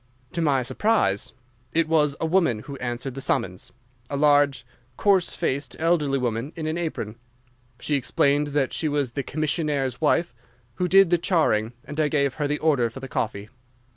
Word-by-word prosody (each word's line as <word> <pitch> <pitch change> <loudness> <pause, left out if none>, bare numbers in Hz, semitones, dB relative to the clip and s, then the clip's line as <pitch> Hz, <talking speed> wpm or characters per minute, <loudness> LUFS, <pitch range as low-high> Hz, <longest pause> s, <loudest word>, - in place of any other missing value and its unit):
"To 170 - -2
my 140 -5 +2
surprise, 120 - +1 0.4
it 165 0 +2
was 150 -3 +2
a - - -1
woman 160 - +2
who 140 - -8
answered 125 +1 -4
the 135 - -6
summons, 90 -7 -2 0.4
a 140 - -2
large, 145 -3 +3 0.3
coarse 195 -4 +2
faced, 140 -5 -2
elderly 160 -4 +1
woman, 125 +3 -2
in 160 -2 -5
an 155 +1 -1
apron. 155 -10 -4 0.6
She 150 - -2
explained 145 +1 +2
that 145 -2 0
she 155 - -1
was 145 -4 -1
the 140 - -2
commissionnaire's 150 -3 -2
wife, 160 0 +2 0.4
who 180 - 0
did 195 -1 +5
the 175 - +4
charing, 125 - +1
and 150 +2 -7
I 155 - +3
gave 140 -3 +1
her 145 -2 -2
the 150 +1 -1
order 140 -7 +2
for 120 - -10
the 135 - -7
coffee. 105 -4 -3
145 Hz, 175 wpm, -24 LUFS, 130-160 Hz, 0.6 s, did